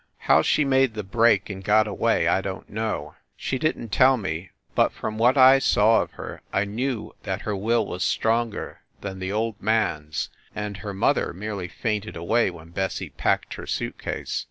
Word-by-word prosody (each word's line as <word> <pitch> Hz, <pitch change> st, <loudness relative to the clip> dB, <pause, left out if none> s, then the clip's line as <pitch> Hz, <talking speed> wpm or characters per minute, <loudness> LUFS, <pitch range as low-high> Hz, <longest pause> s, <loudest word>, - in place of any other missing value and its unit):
How -, -, +4 dB
she 145 Hz, -, +2 dB
made 135 Hz, -3 st, +3 dB
the 105 Hz, -, -3 dB
break 110 Hz, 0 st, +3 dB
and 95 Hz, -2 st, -7 dB
got 110 Hz, +2 st, +4 dB
away 100 Hz, -, +1 dB
I -, -, +3 dB
don -, -, -5 dB
t -, -, -19 dB
know. 105 Hz, -9 st, -3 dB, 0.2 s
She 130 Hz, -, -2 dB
didn 155 Hz, -6 st, -1 dB
t 100 Hz, -, -3 dB
tell 130 Hz, +1 st, +6 dB
me, 95 Hz, -4 st, -4 dB, 0.2 s
but -, -, +3 dB
from 110 Hz, 0 st, -5 dB
what 125 Hz, +4 st, +4 dB
I 130 Hz, +1 st, +8 dB
saw 110 Hz, -3 st, +4 dB
of -, -, -6 dB
her -, -, -8 dB
I 100 Hz, -, +1 dB
knew 115 Hz, +3 st, -3 dB
that 95 Hz, 0 st, -3 dB
her 105 Hz, -, -2 dB
will 110 Hz, +3 st, +1 dB
was 90 Hz, -1 st, -3 dB
stronger 115 Hz, 0 st, -1 dB, 0.2 s
than 95 Hz, -2 st, -6 dB
the 95 Hz, +1 st, -3 dB
old 110 Hz, 0 st, -2 dB
man 110 Hz, -9 st, +1 dB
s 75 Hz, -, -3 dB, 0.3 s
and 105 Hz, -1 st, -4 dB
her 100 Hz, -1 st, -6 dB
mother 95 Hz, -, +1 dB
merely 100 Hz, 0 st, -5 dB
fainted 105 Hz, +2 st, -3 dB
away 95 Hz, +7 st, +1 dB
when 85 Hz, -2 st, -11 dB
Bessie 95 Hz, +2 st, -3 dB
packed -, -, 0 dB
her -, -, -8 dB
suit -, -, -3 dB
case. -, -, -3 dB
105 Hz, 200 wpm, -24 LUFS, 95-115 Hz, 0.3 s, I